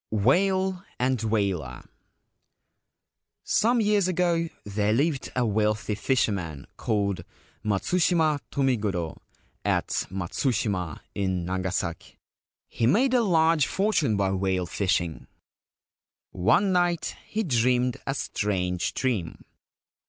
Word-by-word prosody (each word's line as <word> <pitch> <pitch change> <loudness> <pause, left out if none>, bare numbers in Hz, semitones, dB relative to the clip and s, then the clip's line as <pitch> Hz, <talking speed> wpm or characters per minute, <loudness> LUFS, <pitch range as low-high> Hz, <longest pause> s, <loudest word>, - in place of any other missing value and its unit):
WHALE 185 - +2
AND 125 -1 0
WHALER. 100 - -1 0.8
— - - -57
Some 240 +2 +2
years 205 -3 +3
ago 170 -2 +1
there 105 +1 0
lived 140 +2 0
a 125 -1 +2
wealthy 105 0 0
fisherman 100 - -1
called 100 -5 -1 0.4
Matsushima 155 - +2
Tomigoro 105 - -1 0.4
at - - 0 0.2
Matsushima, 95 - -2
in 95 -3 -1
Nagasaki. 90 -2 -3 0.5
He 115 - 0
made 250 - +3
a 250 - +5
large 165 - +3
fortune 175 - +1
by 100 -1 +1
whale 95 -1 0
fishing. 85 -3 -1 1.0
One 115 - +3
night 175 -2 +1
he 220 +1 -1
dreamed 125 - +2
a 135 - 0
strange 90 -8 -1
dream. 110 -11 -2
110 Hz, 100 wpm, -26 LUFS, -, 1.0 s, a